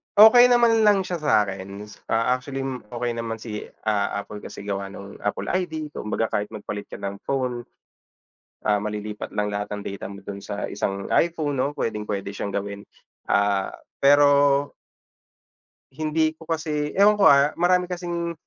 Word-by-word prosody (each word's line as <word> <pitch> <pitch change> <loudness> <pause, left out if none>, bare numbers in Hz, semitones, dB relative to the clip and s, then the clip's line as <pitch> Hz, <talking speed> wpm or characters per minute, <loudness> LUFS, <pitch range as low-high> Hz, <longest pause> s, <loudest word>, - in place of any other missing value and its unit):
okey 220 +4 +9
naman 235 -2 +4
lang 200 -2 +4
siya 180 -2 -4
sa 130 -8 +4
'kin. 100 +1 -7 0.2
Ah, 115 +2 +1
actually 135 +1 -5 0.3
okey 120 0 -1
naman 115 -1 -3
si, 105 -3 -6 0.2
ah, 100 -1 0
Apple 105 0 -9
kasi 100 - -9
gawa 100 -1 -3
nung 100 0 -10
Apple 105 - -2
ID. 160 -5 -2
Kumbaga 110 -3 -2
kahit 105 0 -1
magpalit 105 -1 -6
ka - - -9
ng 100 0 -5
phone, 125 -2 -2 1.0
ah, 105 - +4
malilipat 105 0 -5
lang 105 0 -1
lahat 105 0 -3
ng 105 0 -4
data 100 - -5
mo 100 - -10
dun 100 0 -8
sa 100 0 -4
isang 100 0 -3
iPhone, 160 -4 +1
'no, 135 +2 0
puwedeng-puwede 105 -7 -3
siyang 100 - -4
gawin, 100 0 -4 0.5
ah, 100 -1 +2 0.3
pero 145 0 +5 1.2
hindi 155 0 0
ko 160 0 -16
kasi 155 -2 -2
ewan 205 +1 +6
ko, 195 - +8
ah, 140 +1 +5
marami 180 +1 +3
kasing 175 -1 -3
120 Hz, 160 wpm, -24 LUFS, 100-155 Hz, 1.2 s, okey